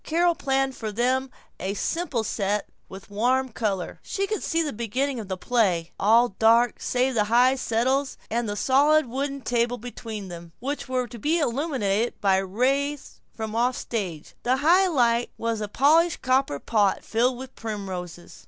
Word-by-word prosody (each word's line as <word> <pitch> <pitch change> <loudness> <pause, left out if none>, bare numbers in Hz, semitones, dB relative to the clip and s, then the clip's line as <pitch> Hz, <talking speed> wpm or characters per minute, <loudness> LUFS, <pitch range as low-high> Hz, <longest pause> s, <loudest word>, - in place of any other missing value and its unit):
Carol 340 +2 +2
planned 270 -3 0
for 220 -2 -5
them 255 +4 0 0.3
a 195 +2 -3
simple 275 - -1
set 205 -1 -1 0.2
with 190 +1 -11
warm 255 +5 +1
color. 205 -6 -3
She 395 - -2
could 425 0 -3
see 330 -1 0
the 300 - -3
beginning 245 +4 -2
of 215 - -7
the 190 -1 -3
play: 180 -6 +1
all 230 +4 +5
dark 230 +1 +4
save 255 +1 +1
the 215 -3 +2
high 245 +4 +4
settles 260 +2 0
and 230 -1 -1
the 205 - -2
solid 290 +6 +4
wooden 275 +3 -3
table 240 0 0
between 225 -3 -7
them, 170 -2 -10
which 275 +2 -4
were 255 -1 0
to 240 0 -10
be 310 +10 +1
illuminated 240 -7 -1
by 195 -2 +3
a 195 - -1
ray 275 +8 +1 0.4
from 220 -1 -5
offstage. 225 -8 -2
The 255 +2 +1
high 370 +4 +6
light 240 -7 +2
was 230 -1 -2
a 210 - -2
polished 310 +9 +3
copper 255 - +2
pot 205 +5 +1
filled 240 +3 +1
with 260 0 -9
primroses. 190 -6 -6
240 Hz, 170 wpm, -25 LUFS, 210-270 Hz, 0.4 s, high